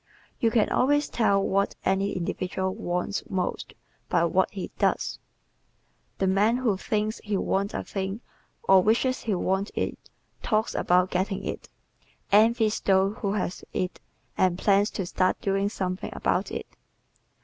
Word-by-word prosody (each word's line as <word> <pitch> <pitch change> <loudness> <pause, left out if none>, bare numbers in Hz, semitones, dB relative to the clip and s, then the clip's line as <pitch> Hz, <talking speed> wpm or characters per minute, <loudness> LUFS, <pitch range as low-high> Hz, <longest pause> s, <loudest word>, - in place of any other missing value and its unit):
You 230 - +3
can 220 -1 +3
always 290 +3 +2
tell 200 -4 +2
what 200 +1 +1
any 195 +1 +1
individual 185 +1 -2
WANTS 180 +3 -2
MOST 185 -2 -3 0.3
by - - +3
what - - +2
he - - -6
DOES. - - 0 1.0
The 195 - 0
man 205 +5 +3
who 240 -6 +1
thinks 215 +3 -2
he 210 -2 -1
wants 195 +2 -1
a - - -2
thing 195 +3 -4 0.4
or 190 -1 +6
wishes 235 +6 +2
he 215 -4 -1
wanted 190 +3 -1
it - - -3 0.3
talks 215 -2 0
about 180 +1 +2
getting 190 +2 -1
it, - - -5 0.6
envies 220 +1 +4
those 195 +2 +2
who 200 -2 -1
have 185 -3 -3
it 180 0 -2 0.4
and 185 -2 +3
plans 200 +1 +3
to 190 - -4
start 185 +1 +1
doing 195 0 0
something 185 -3 -3
about - - 0
it. - - -4
195 Hz, 150 wpm, -26 LUFS, 190-215 Hz, 1.0 s, or